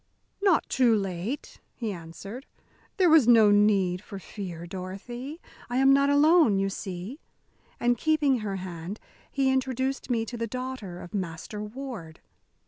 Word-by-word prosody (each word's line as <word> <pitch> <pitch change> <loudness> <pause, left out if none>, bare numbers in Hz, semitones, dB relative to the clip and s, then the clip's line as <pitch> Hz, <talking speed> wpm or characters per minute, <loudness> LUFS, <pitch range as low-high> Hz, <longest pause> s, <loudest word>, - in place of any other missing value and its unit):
"Not 385 -6 +3
too 245 -4 +3
late," 195 +6 -4 0.2
he 225 -4 -3
answered; 190 - -9 0.5
"there 370 -2 +5
was 315 -7 +6
no 225 -3 +7
need 200 -3 +3
for 205 -1 -9
fear, 180 -4 -7
Dorothy. 200 - -7 0.3
I 245 - -1
am 270 +1 +6
not 280 +1 +4
alone, 295 - +5
you 195 0 0
see." 195 - -6 0.6
And 240 -1 +2
keeping 295 -5 +2
her 205 -2 -3
hand, 180 +1 -6 0.3
he 270 -1 +1
introduced 265 +1 -1
me 230 -2 +1
to 240 +1 -6
the 230 0 -2
daughter 250 -7 -5
of 175 - -11
Master 185 +2 -4
Ward. 210 -7 -7
225 Hz, 145 wpm, -27 LUFS, 190-265 Hz, 0.6 s, no